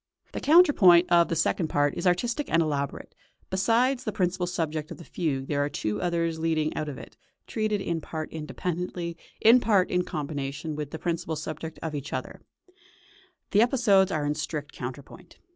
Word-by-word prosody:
The - - -4
counterpoint 205 - +6
of 170 -1 +5
the 165 - -2
second 160 +1 +1
part 145 -1 +1
is - - -1
artistic 235 +11 0
and 165 - +4
elaborate; 140 -3 -3 0.4
besides 235 +7 +2
the 215 - -2
principal 180 -2 -1
subject 160 -4 -3
of - - -8
the 170 - -11
fugue 145 -6 -2
there 145 0 0
are 145 - -1
two 105 -7 -3
others 165 -2 -1
leading 160 -1 0
out 155 - -3
of 135 - -7
it, - - -12 0.3
treated 215 -2 -1
in 170 -3 -2
part 155 0 -6
independently, 170 +2 -4 0.3
in 230 +3 +7
part 205 -6 +2
in 180 0 +2
combination 150 0 -4
with 150 -1 -4
the 160 - -6
principal 165 -1 -2
subject 155 +1 -6
and 160 -1 -3
each 145 -1 -5
other; - - -5 1.1
the 205 - +5
episodes 225 -6 +4
are 150 -2 -1
in 145 - +1
strict 150 -1 -4
counterpoint. 130 +2 -9
165 Hz, 175 wpm, -27 LUFS, 150-185 Hz, 1.1 s, in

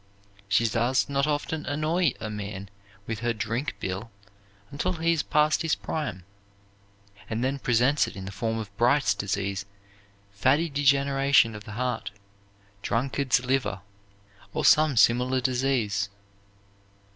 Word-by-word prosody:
She 105 +4 +3
does 120 +4 +1
not 140 +1 +1
often 150 +1 -2
annoy 155 +2 +1
a 110 - -4
man 100 -2 -6 0.4
with 110 -1 -4
her 120 0 0
drink 115 +6 -3
bill 95 +4 -4 0.6
until 145 +6 -1
he 165 0 +1
is 160 - 0
past 150 +1 +2
his 160 -2 +1
prime, 120 - -4 1.1
and 115 +2 -2
then 135 +2 -1
presents 125 +4 +2
it - - -9
in 95 -1 -7
the 100 - -6
form 110 +3 -2
of 100 -3 -7
Bright's 125 +5 +3
disease, 100 0 -3 0.6
fatty 130 +11 +2
degeneration 140 -3 +3
of 105 -1 -9
the 105 - -8
heart, 125 0 -2 0.7
drunkard's 125 +3 0
liver, 125 -7 0 0.7
or - - 0
some 155 -4 +5
similar 125 +4 +4
disease. 125 -6 0
125 Hz, 135 wpm, -26 LUFS, 105-140 Hz, 1.1 s, some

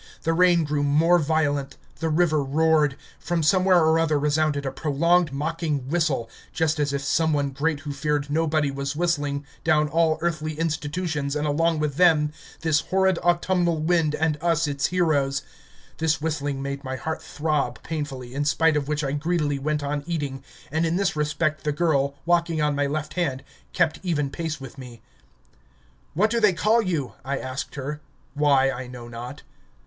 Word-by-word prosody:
The 165 - +1
rain 175 -1 +4
grew 150 -1 -1
more 160 +5 +4
violent, 145 -3 0 0.2
the 160 0 -1
river 155 -1 +2
roared; 150 0 +2 0.2
from 170 -2 -1
somewhere 185 +3 +4
or 160 +1 +4
other 160 -2 +2
resounded 150 0 +1
a 135 - -1
prolonged 165 +4 +2
mocking 150 -1 -2
whistle 155 -8 0 0.2
just 160 -1 0
as 145 -1 +1
if 140 0 -2
Someone 145 -2 +1
great 145 +2 -1
who 145 -1 -5
feared 145 0 -1
nobody 155 -1 +1
was 140 +1 -4
whistling 145 -4 -1 0.2
down 155 -1 +3
all 160 +1 +2
earthly 155 -2 -1
institutions 150 -2 -2
and 150 0 -1
along 165 +3 +1
with 150 -2 -2
them 155 -4 +4 0.3
this 160 -2 +2
horrid 190 0 +1
autumnal 175 -1 +1
wind 160 -1 +1
and 155 -2 0
us 165 -1 +2
its 140 -1 0
heroes. 145 -6 +1 0.6
This 160 0 +1
whistling 145 -3 -2
made 140 +1 -4
my 130 -1 -4
heart 160 +5 -4
throb 150 -1 -2
painfully, 135 -6 -5
in 140 +2 -1
spite 155 +3 +3
of 145 -2 -1
which 150 0 -1
I 135 - -1
greedily 150 -1 0
went 150 +1 -1
on 145 0 -2
eating, 145 -5 -3 0.3
and 160 +2 0
in 165 0 +1
this 190 -3 0
respect 150 +1 -1
the 150 - 0
girl, 145 -3 +1
walking 170 -2 +2
on 150 -1 +2
my 145 0 +1
left 155 +1 -3
hand, 140 -7 -1 0.3
kept 170 -3 +1
even 150 -7 -1
pace 160 -2 -4
with 135 0 -10
me. 120 -3 -11 1.1
"What 210 +6 +2
do 235 - +2
they 210 -4 +4
call 215 +6 +3
you?" 165 - -2
I 135 +2 -2
asked 130 +1 -5
her 145 +2 -5 0.3
why 140 -2 +3
I 130 -1 -6
know 125 -1 -9
not. 120 +4 -8
150 Hz, 175 wpm, -24 LUFS, 140-165 Hz, 1.1 s, rain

